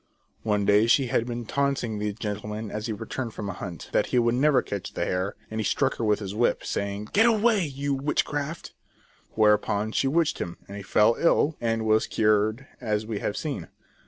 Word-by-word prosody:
One 105 -2 0
day 105 +3 +4
she 130 +1 +3
had 115 - +1
been 120 -1 -4
taunting 135 -4 -1
the 105 0 -1
gentleman 105 0 -5
as 105 +2 -4
he - - -2
returned 115 +2 -5
from 100 -2 -4
a - - -3
hunt, 90 -3 -7
that - - +2
he - - 0
could 120 -1 +3
never 140 +2 +3
catch 100 -2 -5
the - - -1
hare, 95 +2 -1 0.2
and 110 - -3
he - - 0
struck 135 +6 +1
her - - -3
with 105 -1 +3
his 100 -2 -6
whip, 115 +3 +1
saying: 100 +1 -3
" - - -30
Get 220 +3 +5
away, 220 -4 +3
you 140 0 -2
witchcraft!" 145 +2 -2 0.6
Whereupon 105 0 +2
she 135 - +1
witched 160 +3 +1
him, 85 0 -4
and 100 - -8
he 100 - -6
fell 105 +4 +3
ill, 160 -2 +3
and 115 -1 0
was 110 0 +3
cured 110 +3 +1 0.2
as 110 -2 -1
we 110 -2 -3
have 105 - -2
seen. 150 -3 -4
110 Hz, 210 wpm, -26 LUFS, 105-135 Hz, 0.6 s, Get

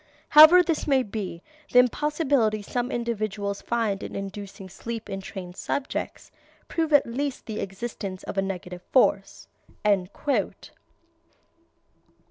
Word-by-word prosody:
However 315 +4 +9
this 330 -3 -1
may 270 -3 +3
be, 195 -6 -6 0.3
the - - +3
impossibility 255 -4 +2
some 245 +4 -2
individuals 215 -4 -3
find 225 -4 -1
in - - -7
inducing 195 -1 -7
sleep 230 +4 -7
in 195 0 -4
trained 185 -2 -8
subjects, 280 +7 -4 0.4
proves 320 -2 -1
at 290 - +6
least 270 +3 -3
the 220 -1 -5
existence 195 -1 -5
of - - -6
a 195 - +2
negative 180 -2 -5
force." 260 - +2
220 Hz, 115 wpm, -25 LUFS, 195-265 Hz, 0.4 s, However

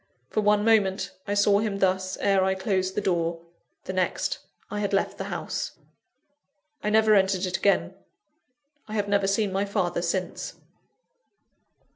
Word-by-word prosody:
For 215 - +1
one 210 0 +3
moment, 195 -4 +2 0.2
I 205 - 0
saw 205 0 +4
him 210 -2 -1
thus, 190 -1 0
ere 195 -1 +3
I 190 0 +1
closed 190 -1 -1
the 210 - 0
door 170 -3 0 0.4
the 190 - -5
next, 185 -1 -1 0.3
I 210 - -2
had 205 -1 -1
left 195 - 0
the - - -3
house. - - -4 1.1
I 210 - -1
never 220 0 +5
entered 190 -1 +3
it 185 0 -2
again 200 - +2 0.9
I 215 - -6
have 205 -1 0
never 200 -1 +2
seen 200 0 +1
my 195 +1 +1
father 175 -3 -1
since. 180 +1 -3
195 Hz, 155 wpm, -26 LUFS, 190-205 Hz, 1.1 s, never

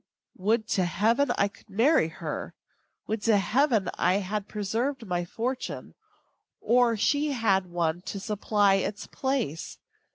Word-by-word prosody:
Would 220 +4 +1
to 185 - +2
Heaven 225 - +2
I 200 - +3
could 200 - -18
marry 230 - +3
her! 165 - -6 0.5
Would 220 0 -2
to 220 -2 +5
Heaven 220 +1 +2
I 180 - +3
had 205 +1 -2
preserved 225 +5 -2
my 175 -2 -2
fortune, 245 +8 -4 0.7
or 240 -1 +3
she 285 +6 +1
had 195 -6 +1
one 175 -1 -1
to 200 - -4
supply 205 -1 +2
its 205 +2 -4
place! 260 - -3
210 Hz, 135 wpm, -27 LUFS, 190-240 Hz, 0.7 s, to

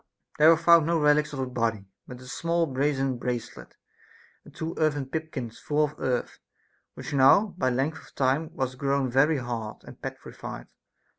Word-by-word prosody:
There 155 +1 +8
were 165 - +6
found 170 -1 +5
no 170 -1 +2
relics 150 0 +3
of 145 - -6
a 130 - -1
body; 115 -5 -2 0.2
but 125 0 -10
a - - -12
small 170 +5 0
brazen 135 -2 -1
brace 120 -2 -3
let, - - -13 0.7
and - - -15
two 160 +1 -5
earthen 150 -3 +1
pipkins 135 -5 -5
full 150 +1 +1
of 150 0 -2
earth, 125 -2 -2 0.6
which - - -7
now 180 +10 +5
by 130 -8 +1
length 135 +6 -1
of - - -22
time 140 +4 +1
was 130 -1 -3
grown 135 -1 0
very 145 +5 +3
hard 120 -4 -5
and - - -13
petrified. - - -8
140 Hz, 175 wpm, -26 LUFS, 130-155 Hz, 0.7 s, There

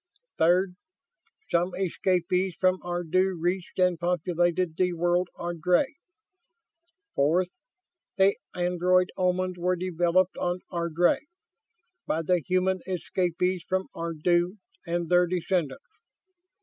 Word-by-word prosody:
Third, 180 +2 +3 0.7
some 175 +2 +1
escapees 185 0 0
from 185 0 +3
Ardu 175 +1 0
reached 175 +2 -2
and 180 -2 +2
populated 175 0 0
the 180 0 +1
world 175 +1 +1
Ardry. 175 - 0 1.2
Fourth, 175 +6 +2 0.7
the 195 +1 +4 0.2
android 180 +1 +2
Omans 185 -1 0
were 180 +1 +1
developed 180 +1 +1
on 180 +1 -1
Ardry, 170 - +1 0.8
by 165 +1 0
the 180 +1 +2
human 185 +2 +1
escapees 180 0 -1
from 185 0 -1
Ardu 175 +3 0 0.3
and 170 0 -1
their 180 0 +4
descendants. 175 -5 -1
180 Hz, 100 wpm, -27 LUFS, 175-185 Hz, 1.2 s, the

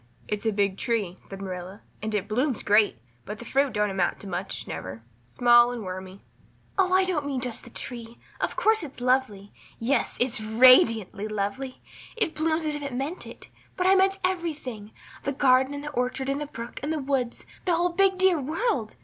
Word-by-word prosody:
"It's 210 +1 -2
a - - +3
big 200 -2 0
tree," 210 -7 -1
said 195 0 -7
Marilla, 185 +2 -7 0.2
"and 215 0 -2
it 200 -2 -1
blooms 250 +3 0
great, 210 - +4 0.3
but 210 - -7
the 235 - -10
fruit 275 +2 +1
don't 210 -1 +1
amount 185 -2 0
to 200 - -8
much 185 +1 -4
never 110 +5 -6 0.2
small 240 - +5
and 240 -3 -5
wormy." 185 +1 -7 0.5
"Oh, 375 -1 +2
I 375 +1 +5
don't 360 -6 0
mean 280 -2 -2
just 250 -2 -2
the - - -11
tree; 235 -1 -6 0.2
of - - -1
course 440 0 +3
it's 285 -5 -9
lovely 245 -6 0 0.2
yes, 245 +3 0
it's 245 -3 +1
radiantly 220 -3 +5
lovely 215 +5 -4 0.3
it 410 -8 +2
blooms 315 +1 0
as 305 - 0
if 295 - -4
it 275 -3 -4
meant 280 +8 -4
it - - -11 0.3
but 365 - 0
I 380 - +6
meant 390 0 +4
everything, 300 - -3 0.3
the 280 - -1
garden 260 0 +4
and 285 - -6
the 295 - -5
orchard 255 +1 -1
and 275 +2 -1
the 295 - -3
brook 235 -3 -8
and 290 +4 -2
the 320 - 0
woods, 265 -4 -2 0.2
the 355 -2 +3
whole 350 +2 +2
big 380 +2 +3
dear 370 -4 +3
world. 295 - -1
250 Hz, 200 wpm, -26 LUFS, 210-295 Hz, 0.5 s, I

